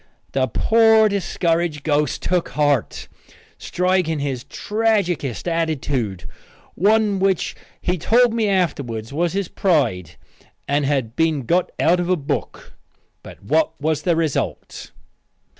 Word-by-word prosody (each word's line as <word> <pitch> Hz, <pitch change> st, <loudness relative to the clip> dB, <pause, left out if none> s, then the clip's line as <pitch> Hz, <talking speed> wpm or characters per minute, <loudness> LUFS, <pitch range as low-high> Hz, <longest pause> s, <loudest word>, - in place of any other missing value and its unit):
The 130 Hz, -1 st, +1 dB
poor 220 Hz, +3 st, +4 dB
discouraged 170 Hz, -5 st, -1 dB
ghost 150 Hz, -2 st, 0 dB
took 180 Hz, -1 st, 0 dB
heart, 145 Hz, -5 st, 0 dB, 0.5 s
striking 180 Hz, -3 st, 0 dB
his 135 Hz, -4 st, -3 dB
tragicest 200 Hz, -, -1 dB
attitude, 145 Hz, -, -2 dB, 0.5 s
one 210 Hz, +1 st, +2 dB
which 190 Hz, -2 st, 0 dB, 0.2 s
he 180 Hz, 0 st, -1 dB
told 240 Hz, +6 st, +3 dB
me 225 Hz, -2 st, +1 dB
afterwards 140 Hz, -, -2 dB
was 170 Hz, +3 st, 0 dB
his 195 Hz, -2 st, -1 dB
pride 130 Hz, -, 0 dB, 0.5 s
and 145 Hz, 0 st, +1 dB
had 130 Hz, -5 st, -1 dB
been 160 Hz, -4 st, +1 dB
got 175 Hz, +8 st, +1 dB
out 175 Hz, +3 st, +3 dB
of 175 Hz, 0 st, -2 dB
a 185 Hz, -, +3 dB
book. 140 Hz, -2 st, -5 dB, 0.5 s
But -, -, -13 dB
what 155 Hz, +9 st, 0 dB
was 155 Hz, 0 st, -1 dB
the 170 Hz, +1 st, +1 dB
result? 160 Hz, -4 st, -3 dB
165 Hz, 125 wpm, -21 LUFS, 140-185 Hz, 0.5 s, poor